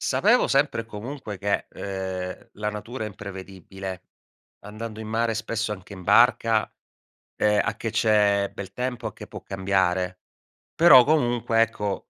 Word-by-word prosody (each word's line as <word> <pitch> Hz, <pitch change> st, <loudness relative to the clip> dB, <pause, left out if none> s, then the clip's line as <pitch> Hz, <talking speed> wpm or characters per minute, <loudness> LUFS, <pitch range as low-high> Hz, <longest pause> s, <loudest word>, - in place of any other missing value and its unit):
Sapevo 235 Hz, +5 st, +3 dB
sempre 140 Hz, -4 st, +1 dB
e -, -, -17 dB
comunque 110 Hz, -1 st, -7 dB
che, 100 Hz, +1 st, -1 dB
ehm, 95 Hz, -2 st, -5 dB
la 105 Hz, 0 st, -3 dB
natura 110 Hz, +3 st, -6 dB
è -, -, -3 dB
imprevedibile, 95 Hz, -1 st, -8 dB, 0.6 s
andando 110 Hz, +1 st, -8 dB
in 110 Hz, -, -7 dB
mare, 115 Hz, 0 st, 0 dB
spesso 110 Hz, -1 st, -2 dB
anche 100 Hz, 0 st, -9 dB
in 95 Hz, -, -10 dB
barca, 115 Hz, +1 st, +4 dB, 0.7 s
ehm, 105 Hz, -1 st, +3 dB
a 115 Hz, -, -2 dB
che 115 Hz, -, -3 dB
c'è 105 Hz, -3 st, +2 dB
bel 95 Hz, -1 st, -8 dB
tempo, 125 Hz, -1 st, -3 dB
a 105 Hz, -, -7 dB
che -, -, -11 dB
può -, -, -9 dB
cambiare. 95 Hz, -1 st, 0 dB, 0.6 s
Però 145 Hz, -7 st, +8 dB
comunque, 120 Hz, -6 st, +2 dB
ecco, 105 Hz, -3 st, -2 dB
105 Hz, 150 wpm, -25 LUFS, 95-115 Hz, 0.7 s, Però